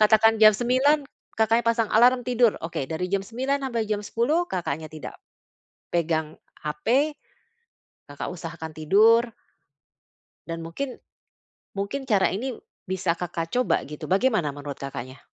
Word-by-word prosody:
katakan 220 +1 +6
jam 215 0 +10
09:00 255 +7 +3 0.4
Kakaknya 225 +1 +3
pasang 230 -2 0
alarm 245 +2 +6
tidur. 240 -3 +4
Oke, 165 -4 -3
dari 160 +6 -3
jam 195 - +1
9:00 260 +6 -1
sampai 235 -4 -1
jam 210 -1 0
10:00 280 +12 +1
Kakaknya 160 - -3
tidak 155 - -8 0.8
pegang 160 -2 0 0.3
HP, 235 - +1 1.0
Kakak 145 - -5
usahakan 165 -2 -7
tidur. 210 +9 +5 1.2
Dan 165 0 -5
mungkin, 250 +11 -5 0.8
mungkin 260 +8 -3
cara 195 -5 +3
ini 245 +5 -3 0.2
bisa 185 -2 -1
Kakak 165 -1 -5
coba, 250 0 +1
gitu. 150 +1 -8
Bagaimana 195 - +2
menurut 145 0 -7
Kakaknya? 130 -1 -7
200 Hz, 130 wpm, -25 LUFS, 165-240 Hz, 1.2 s, jam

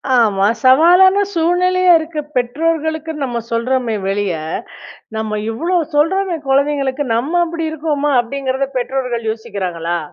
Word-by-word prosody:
ஆமா, 205 -5 +3 0.2
சவாலான 350 +9 +6 0.2
சூழ்நிலையா 360 +2 +2
இருக்கிற 315 -1 -5
பெற்றோர்களுக்குன்னு 315 +3 -1
நம்ம 240 -2 -3
சொல்றோமே 235 0 0
வெளியே. 195 -5 -1 0.7
நம்ம 215 -1 -2
இவ்ளோ 335 +10 -1 0.2
சொல்றோமே 350 +3 +1
கொழந்தைங்களுக்கு, 275 0 +1
நம்ம 310 +9 0
அப்படி 330 -1 -4
இருக்கோமா? 295 -2 -1
அப்படிங்கிறத, 265 +2 -3
பெற்றோர்கள் 245 -3 -2
யோசிக்கிறாங்களா? 185 -7 -4
275 Hz, 105 wpm, -17 LUFS, 230-325 Hz, 0.7 s, சவாலான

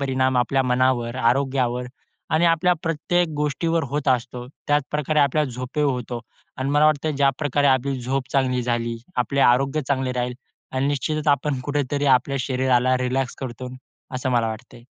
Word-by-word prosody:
परिणाम 130 -1 +1
आपल्या 135 +2 +2
मनावर, 125 -1 +1
आरोग्यावर 125 0 +1 0.4
आणि 160 +2 +3
आपल्या 170 +2 +3
प्रत्येक 165 +2 0
गोष्टीवर 155 +3 0
होत 145 +1 -2
असतो. 125 -1 -1 0.2
त्याचप्रकारे 150 +1 +1
आपल्याला 145 0 +2
झोप 125 +4 -6
होतो 125 -4 -1 0.4
अन् 130 +1 -1
मला 145 +1 +4
वाटतं 155 0 +1
ज्याप्रकारे 140 +1 +1
आपली 135 0 +2
झोप 130 +1 -2
चांगली 130 -2 +1
झाली 120 -1 -1 0.2
आपले 135 +3 0
आरोग्य 135 +5 +3
चांगले 130 -2 0
राहील 125 0 -2 0.4
अन् 130 +1 0
निश्चितच 150 +2 -1
आपण 140 -1 +1
कुठेतरी 145 0 -1
आपल्या 140 +2 -5
शरीराला 130 0 +2
रिलॅक्स 125 0 -1
करतो 125 -1 -6 0.5
असं 130 0 -2
मला 120 -2 +2
वाटते. 120 +2 -9
130 Hz, 150 wpm, -23 LUFS, 125-145 Hz, 0.5 s, मला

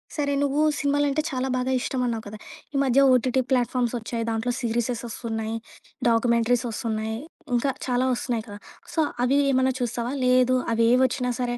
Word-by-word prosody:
సరే, 285 -2 0
నువ్వు 285 +2 +1 0.2
సినిమాలంటే 285 +1 +1
చాలా 260 0 -1
బాగా 255 +1 -1
ఇష్టం 255 0 -2
అన్నావు 230 -2 -2
కదా! 210 +1 -8 0.4
ఈ - - 0
మధ్య 270 0 +3
ఓటీటీ 255 +1 +2
ప్లాట్‌ఫార్మ్స్ 245 -1 +1
ఒచ్చాయి 230 +1 -4
దాంట్లో 225 +2 -1
సిరీసెసొస్తున్నాయి, 230 -1 -2 0.5
డాక్యుమెంటరీస్ 235 +1 +2
ఒస్తున్నాయి 220 -1 -3 0.4
ఇంకా 270 +3 +1 0.2
చాలా 250 +1 +1
ఒస్తున్నాయి 235 -2 -3
కదా! 205 -1 -9 0.3
సో, 325 - -1 0.3
అవి 275 +3 +3
ఏమన్నా 260 0 +2
చూస్తావా? 240 +1 -2
లేదు 255 0 +4 0.2
అవి 230 - +2
ఏవోచ్చినా 255 0 +2
సరే 245 -1 -1
245 Hz, 150 wpm, -25 LUFS, 230-260 Hz, 0.5 s, లేదు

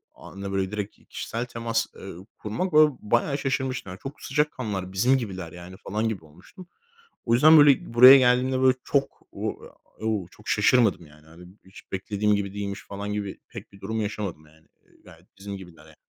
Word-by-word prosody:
anda, 100 0 -8
böyle, 95 0 -1
direkt 105 -1 -5
kişisel 115 +2 -4
temas, 115 -1 -2
eee, 95 - -9 0.2
kurmak, 125 - -3
ba 150 -4 +5
bayağı 120 +6 0
şaşırmıştım. 130 -9 -3
Çok 135 +1 -8
sıcak 150 +2 0
kanlılar, 100 -7 -5
bizim 125 +8 +3
gibiler, 95 -8 -6
yani, 90 +1 -11
falan 110 +3 -1
gibi 95 -7 -6
olmuştum. 90 - -16 0.6
O 115 - +1
yüzden, 155 +6 +7
böyle, 145 -5 +5
buraya 130 +3 +10
geldiğimde, 130 +1 +2
böyle, 130 0 +5
çok 140 -1 -1 0.8
o 110 -5 -1
çok 105 - -18
şaşırmadım, 110 -4 +3
yani. 80 +4 -16 0.2
Hiç 95 - -16
beklediğim 105 +2 0
gibi 100 -1 -3
değilmiş, 100 -1 -5
falan 100 +1 -5
gibi 100 -2 -5
pek - - -10
bir 100 - -17
durum 110 +3 -3
yaşamadım, 100 -7 -5
yani. 80 +1 -24 0.4
Gayet - - -19
bizim 100 0 -7
gibiler, 85 -5 -14
yani. 80 -1 -18
105 Hz, 170 wpm, -25 LUFS, 95-125 Hz, 0.8 s, buraya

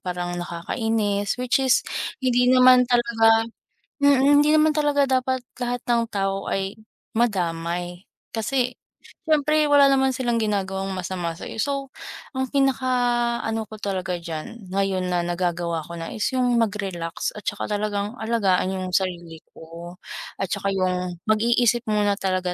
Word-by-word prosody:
parang 180 -1 -4
nakakainis, 205 +3 -1
which 250 +1 +1
is 260 -1 +3 0.4
hindi 250 -1 +3
naman 255 -1 +6
talaga 225 -2 +3 0.5
mm, 285 -2 +4 0.2
hindi 300 +1 +4
naman 310 0 +5
talaga 285 -2 +2
dapat 260 0 +1 0.2
lahat 245 0 -2
ng 235 -1 +3
tao 195 -1 -1
ay 195 +1 -2 0.4
madamay. 175 -4 -1 0.2
Kasi 250 +2 -1 0.5
siyempre 305 -1 +3
wala 285 -1 +6
naman 265 -1 +3
silang 240 -2 0
ginagawang 195 -3 -1
masama 180 -2 -3
sa'yo, 165 - -8
so, 275 -1 -2 0.5
ang 265 - +1
pinaka 270 -2 +2 0.5
ano 225 -1 -2
ko 215 - -14
talaga 185 -2 -2
diyan, 170 +5 -7
ngayon 190 -1 -1
na 175 -1 0
nagagawa 175 -1 -1
ko 170 - -10
na, 165 - -6
is 215 - -1
yung 250 -1 +2
mag-relax 195 -6 -3
at 210 - -9
saka 205 - -3
talagang 205 +1 -2
alagaan 200 -5 +1
yung 185 -1 -4
sarili 175 -4 -2
ko 170 +2 -11 0.4
at 195 - -2
saka 200 0 -1
'yung 180 -1 -1
mag-iisip 235 +2 +2
muna 210 -1 +2
talaga 185 -2 -1
210 Hz, 140 wpm, -23 LUFS, 180-250 Hz, 0.5 s, naman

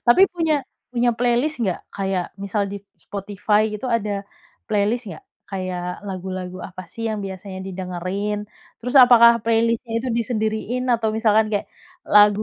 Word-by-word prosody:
Tapi 240 +11 +7
punya 325 -3 +2 0.4
punya 240 0 +3
playlist 245 +5 +1
nggak? 185 -5 0 0.2
Kayak 190 -2 -1 0.2
misal 200 +1 -1
di - - -3 0.3
Spotify 205 +1 0
gitu 210 +5 -4
ada, 205 -2 -3 0.4
playlist 215 +3 +1
nggak? 160 -4 -9 0.2
Kayak 185 -2 -3 0.2
lagu-lagu 185 -1 -5
apa 185 0 -9
sih 230 0 -3
yang 215 -1 -2
biasanya 190 0 -7
didengerin? 190 +3 -3 0.4
Terus 250 +3 -4
apakah 235 -2 +8
playlist-nya 230 +1 +1
itu 255 +3 -3
disendiriin 220 +1 -1
atau 230 -2 +1
misalkan 220 -1 +4
kayak, 205 - 0 0.4
lagu 210 0 +6
210 Hz, 140 wpm, -22 LUFS, 195-230 Hz, 0.4 s, apakah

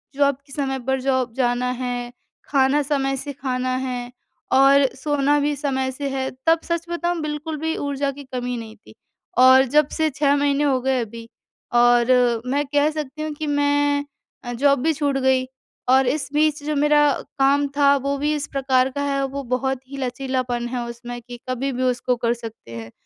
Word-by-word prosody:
Job 280 -1 +3
के 280 - -20
समय 270 -2 -2
पर 265 0 +1
जॉब 260 -2 0
जाना 250 -1 0
है, 245 -1 -3 0.3
खाना 275 +1 +2
समय 270 -1 0
से 285 +2 -6
खाना 255 -2 -2
है, 250 -1 -4 0.4
और 275 +1 +6
सोना 290 +1 +1
भी 290 0 0
समय 265 -2 -1
से 280 +1 -4
है। 265 -1 -2 0.2
तब 325 0 +4
सच 335 0 -2
बताऊँ 345 0 -1
बिल्कुल 305 +1 -4
भी 320 +1 -1
ऊर्जा 280 -1 -2
की 285 +1 -10
कमी 250 0 -2
नहीं 220 -1 -8
थी, 225 - -18 0.4
और 260 +1 +7
जब 290 +3 +3
से 315 -1 +2
6 285 0 +2
महीने 285 0 +1
हो 270 -3 +2
गए 265 -1 +1
अभी 230 +1 -8 0.5
और 240 0 +4
मैं 280 +3 0
कह 290 +1 +2
सकती 305 -1 -6
हूँ 310 0 -3
कि 300 +1 -5
मैं 290 0 +1 0.4
अ, 245 - -5
जॉब 280 +2 +3
भी 320 +1 +2
छूट 285 -2 0
गई, 260 -1 +2 0.4
और 265 0 +5
इस 275 +1 -1
बीच 300 0 +1
जो 300 +1 -2
मेरा 295 +1 +4
अ, - - -3 0.2
काम 280 +1 +3
था 280 -1 +5
वो 280 0 -1
भी 295 +2 0
इस 290 - -4
प्रकार 265 -1 +2
का 285 +2 -4
है, 275 -1 0
वो 275 +1 -4
बहुत 255 +1 -1
ही 275 - -7
लचीलापन 255 -2 -2
है 240 -1 -3
उसमें 240 +1 -7
कि 245 0 -10
कभी 260 +2 -1
भी 255 0 -2
उसको 250 0 +1
कर 235 -1 0
सकते 225 - -10
हैं। 115 0 -8
270 Hz, 195 wpm, -22 LUFS, 250-285 Hz, 0.5 s, और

